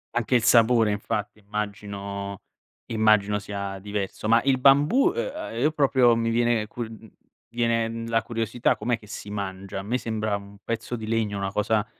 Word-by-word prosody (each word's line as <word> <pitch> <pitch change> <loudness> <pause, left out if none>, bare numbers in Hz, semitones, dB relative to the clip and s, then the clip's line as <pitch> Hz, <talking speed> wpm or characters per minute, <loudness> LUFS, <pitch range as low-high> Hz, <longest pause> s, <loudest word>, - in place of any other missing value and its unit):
Anche 120 +1 +1
il 120 - +3
sapore 115 -2 +5
infatti 105 +1 -3
immagino 100 -1 -5 0.5
immagino 110 -2 +3
sia 100 -1 -5
diverso. 100 +1 -4
Ma 115 +1 +5
il 135 -1 +2
bambù, 145 - +5
ehm, 470 - -4
io 150 +5 +3
proprio 130 -5 +4
mi 115 0 0
viene 120 -1 +2
cu 120 - -5
mhmm, 110 -1 -8
mi 110 - -16 0.4
viene, 115 -1 +1
mhmm, 115 0 -5
la 115 0 +2
curiosità, 115 0 0
com'è 120 -1 0
che 105 -1 -17
si 100 - -8
mangia? 95 -1 -5
A - - -6
me 115 +5 -1
sembra 110 -3 -2
un 100 0 -13
pezzo 115 +1 -3
di 110 -2 -6
legno 110 -3 0
una 95 0 -2
cosa 105 +1 +1
110 Hz, 180 wpm, -25 LUFS, 105-120 Hz, 0.5 s, sapore